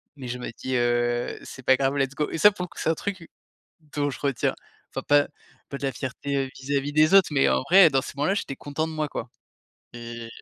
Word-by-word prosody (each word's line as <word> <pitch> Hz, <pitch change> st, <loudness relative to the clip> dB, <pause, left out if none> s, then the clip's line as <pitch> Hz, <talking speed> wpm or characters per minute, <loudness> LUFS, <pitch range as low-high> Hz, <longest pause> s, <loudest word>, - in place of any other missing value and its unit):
mais 130 Hz, -3 st, -8 dB
je 125 Hz, +1 st, -4 dB
me 125 Hz, -, -6 dB
dis: 130 Hz, 0 st, -3 dB
«Heu, 120 Hz, 0 st, 0 dB
c'est 130 Hz, -, -10 dB
pas 130 Hz, -, +5 dB
grave, 135 Hz, +1 st, 0 dB
let's 135 Hz, 0 st, 0 dB
go» 150 Hz, +1 st, -1 dB
et -, -, -3 dB
ça 210 Hz, +6 st, +7 dB
pour 180 Hz, -3 st, -6 dB
que -, -, -12 dB
c'est -, -, 0 dB
un -, -, +4 dB
truc 185 Hz, -1 st, -5 dB, 0.7 s
dont 145 Hz, -1 st, +1 dB
je 135 Hz, -, -7 dB
retiens 140 Hz, -4 st, 0 dB, 0.3 s
enfin -, -, -5 dB
pas 145 Hz, 0 st, +5 dB, 0.4 s
pas 140 Hz, -, -5 dB
de -, -, -11 dB
la 135 Hz, -, 0 dB
fierté, 140 Hz, +2 st, -4 dB
heu, -, -, -12 dB
vis-à-vis 140 Hz, +1 st, -2 dB
des 155 Hz, +4 st, +4 dB
autres, 195 Hz, -2 st, +7 dB
mais 135 Hz, -2 st, +3 dB
en -, -, +2 dB
vrai 180 Hz, -4 st, +8 dB
dans 135 Hz, -, +2 dB
ces -, -, -8 dB
moments-là 150 Hz, +7 st, +1 dB
j'étais 140 Hz, -9 st, -3 dB
content 145 Hz, +2 st, -3 dB
de 160 Hz, -, -7 dB
moi, 155 Hz, -1 st, -1 dB
quoi 120 Hz, -4 st, -6 dB, 0.6 s
et 115 Hz, -1 st, -7 dB
140 Hz, 240 wpm, -25 LUFS, 130-155 Hz, 0.7 s, vrai